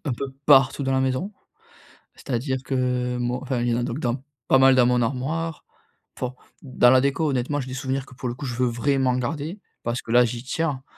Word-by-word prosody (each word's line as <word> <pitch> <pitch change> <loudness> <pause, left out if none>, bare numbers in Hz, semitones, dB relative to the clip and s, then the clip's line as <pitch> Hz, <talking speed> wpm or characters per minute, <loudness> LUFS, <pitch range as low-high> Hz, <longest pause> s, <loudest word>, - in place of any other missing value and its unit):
un 145 - -1
peu 135 +3 -5
partout 135 -1 +5
dans 135 0 0
la 130 - +2
maison. 130 +10 -1 0.8
C'est-à-dire 130 +1 -2
que 125 -2 -1
moi 120 +1 -1
enfin, 130 -3 -2
il 120 - 0
y 115 - +1
en - - 0
a - - -1
donc 120 +3 -3
dans 125 -1 -2 0.2
pas 135 - +5
mal 135 0 +6
dans 125 -1 +5
mon 125 0 +2
armoire. 150 +7 -2 0.5
Enfin, 125 0 -3 0.3
dans 130 -2 +4
la 130 - +6
déco 145 +3 +1
honnêtement 135 +2 -1
j'ai 130 - -7
des 130 - -6
souvenirs 130 0 -2
que - - -15
pour 125 - -5
le 120 - -2
coup 140 - -7
je 125 -2 -4
veux 125 +1 +1
vraiment 130 +2 +1
garder, 150 - -3 0.2
parce 120 +1 -2
que - - -8
là 120 +1 +6
j'y 120 0 -4
tiens. 140 0 -2
130 Hz, 230 wpm, -24 LUFS, 125-140 Hz, 0.8 s, mal